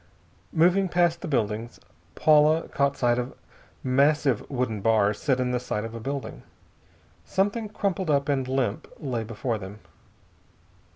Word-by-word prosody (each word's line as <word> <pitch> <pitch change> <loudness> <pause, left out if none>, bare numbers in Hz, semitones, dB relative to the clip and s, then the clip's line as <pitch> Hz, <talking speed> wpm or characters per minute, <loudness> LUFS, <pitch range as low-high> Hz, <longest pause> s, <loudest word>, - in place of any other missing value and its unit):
Moving 180 +4 +3
past 170 -1 +2
the 185 - -5
buildings, 115 -4 -2 0.4
Paula 155 +1 +4
caught 140 0 0
sight 120 0 +2
of 125 +1 -5 0.5
massive 140 -1 +2
wooden 125 -6 -2
bars 105 -1 +2
set 130 -4 +1
in 125 0 0
the 125 - 0
side 105 -3 -3
of 115 - -7
a 115 - -6
building. 135 +3 -5 0.8
Something 205 +3 -1
crumpled 195 -4 -2
up 140 -1 +2
and 135 -3 0
limp 130 -5 -1
lay 125 -5 -2
before 115 +1 -3
them. 95 +1 -8
135 Hz, 140 wpm, -26 LUFS, 115-155 Hz, 0.8 s, Paula